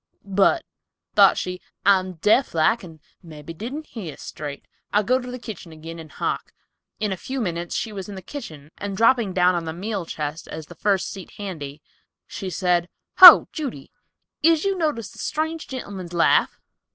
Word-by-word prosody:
"But," 200 - +2 0.5
thought - - +6
she, 180 0 -4 0.2
"I'm 185 -2 +3
deaf 210 - +2
like 205 +9 +2
and 165 -3 -12 0.2
mebby 160 -1 -10
didn't 255 - -6
hear 185 - -8
straight. 145 -2 -8 0.3
I'll 210 +1 +3
go 255 +5 +2
to 250 -1 -8
the 250 - -5
kitchen 220 -8 -9
agin 165 +1 -9
and 160 -2 -11
hark." - - -3 0.5
In 210 -2 -1
a - - -1
few 265 +8 -5
minutes 175 -5 -3
she 220 - -3
was 195 0 -7
in 200 - -7
the 190 - -9
kitchen 155 - -9
and 200 -1 -4
dropping 230 -2 +3
down 180 0 +4
on 170 -1 -2
the 160 - -4
meal 195 0 -4
chest 150 +1 -5
as 160 0 -7
the 175 - -12
first 195 +2 0
seat 190 -3 -10
handy, 155 -8 -7 0.4
she 190 - -6
said, 180 -1 0 0.3
"Ho, 365 -3 +12
Judy, 260 - -6 0.5
is 325 +2 +3
you 390 0 +1
noticed 300 - -2
the - - -14
strange 320 +1 -3
gentleman's 195 -9 -7
laugh?" 170 - +3
190 Hz, 180 wpm, -23 LUFS, 165-230 Hz, 0.5 s, Ho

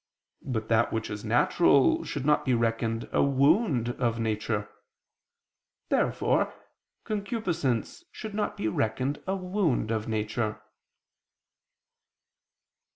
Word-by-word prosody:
But 110 -5 -3
that 115 0 +3
which 110 0 -3
is 105 0 -5
natural 130 +5 +3
should 140 -2 -4
not 150 0 +3
be 130 -3 +2
reckoned 115 0 -1
a - - +2
wound 140 - +3
of 115 -2 +1
nature. 105 -1 -1 1.2
Therefore - - +1 0.5
concupiscence 200 - -2
should 220 -3 -7
not 210 0 -2
be 110 - -1
reckoned 115 +7 -1
a 190 - 0
wound 180 - 0
of 110 -1 -2
nature. 110 0 -2
120 Hz, 105 wpm, -28 LUFS, 110-165 Hz, 1.2 s, that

